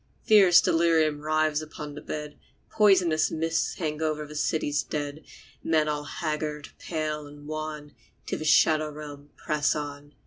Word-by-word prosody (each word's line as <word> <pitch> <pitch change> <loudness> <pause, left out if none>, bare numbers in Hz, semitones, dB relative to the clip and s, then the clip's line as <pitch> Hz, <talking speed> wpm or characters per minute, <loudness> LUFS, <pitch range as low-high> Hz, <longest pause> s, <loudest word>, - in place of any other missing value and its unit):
Fierce 195 -5 +7
delirium 160 -3 +2
writhes 155 0 +1
upon 150 -1 -8
the 150 - -8
bed 150 -1 -6 0.4
Poisonous 180 -7 +4
mists 165 +1 -1
hang 155 -2 -3
o'er 155 -1 -1
the 150 - -11
cities 150 -1 0
dead; 145 0 -5 0.4
Men 155 -2 +2
all 150 -1 -2
haggard, 150 -2 -4
pale, 155 -2 -3
and 145 0 -13
wan, 155 -1 -6 0.3
To - - -3
the - - -5
shadow 155 0 +4
realm 145 -1 -10
press 150 -1 0
on. 145 -1 -7
155 Hz, 145 wpm, -27 LUFS, 150-155 Hz, 0.4 s, Fierce